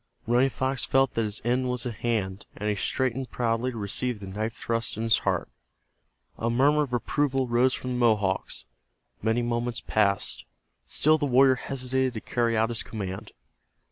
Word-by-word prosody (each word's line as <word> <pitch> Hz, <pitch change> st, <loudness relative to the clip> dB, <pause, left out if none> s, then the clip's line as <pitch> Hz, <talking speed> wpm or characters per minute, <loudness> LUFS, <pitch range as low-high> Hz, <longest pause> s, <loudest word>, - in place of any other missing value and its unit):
Running 125 Hz, +3 st, +3 dB
Fox 130 Hz, 0 st, -1 dB
felt 135 Hz, -2 st, +2 dB
that 115 Hz, -, 0 dB
his 105 Hz, -1 st, -2 dB
end 125 Hz, +1 st, +1 dB
was 125 Hz, -1 st, -2 dB
at 120 Hz, -3 st, -4 dB
hand, 105 Hz, -5 st, -2 dB
and 105 Hz, -, -3 dB
he 105 Hz, -, +2 dB
straightened 130 Hz, +4 st, -1 dB
proudly 115 Hz, +1 st, 0 dB
to 120 Hz, -, -6 dB
receive 110 Hz, +3 st, -2 dB
the 100 Hz, -, -8 dB
knife 110 Hz, +4 st, -3 dB
thrust 115 Hz, -2 st, -2 dB
in 110 Hz, -, -2 dB
his 115 Hz, -1 st, +4 dB
heart. -, -, -1 dB, 0.9 s
A 115 Hz, -, 0 dB
murmur 140 Hz, +5 st, +4 dB
of 140 Hz, -4 st, -2 dB
approval 135 Hz, +2 st, 0 dB
rose 120 Hz, +2 st, +3 dB
from 125 Hz, -, -5 dB
the 125 Hz, -, -1 dB
Mohawks. 105 Hz, -5 st, +1 dB, 0.6 s
Many 110 Hz, +3 st, +1 dB
moments 120 Hz, 0 st, -1 dB
passed. 100 Hz, -2 st, 0 dB, 0.4 s
Still 155 Hz, +1 st, +3 dB
the 145 Hz, -, 0 dB
warrior 130 Hz, +1 st, +6 dB
hesitated 130 Hz, -1 st, -2 dB
to 110 Hz, -, -4 dB
carry 115 Hz, -2 st, 0 dB
out 110 Hz, +1 st, +2 dB
his 115 Hz, -2 st, -1 dB
command. 95 Hz, -3 st, -6 dB
120 Hz, 175 wpm, -27 LUFS, 110-130 Hz, 0.9 s, warrior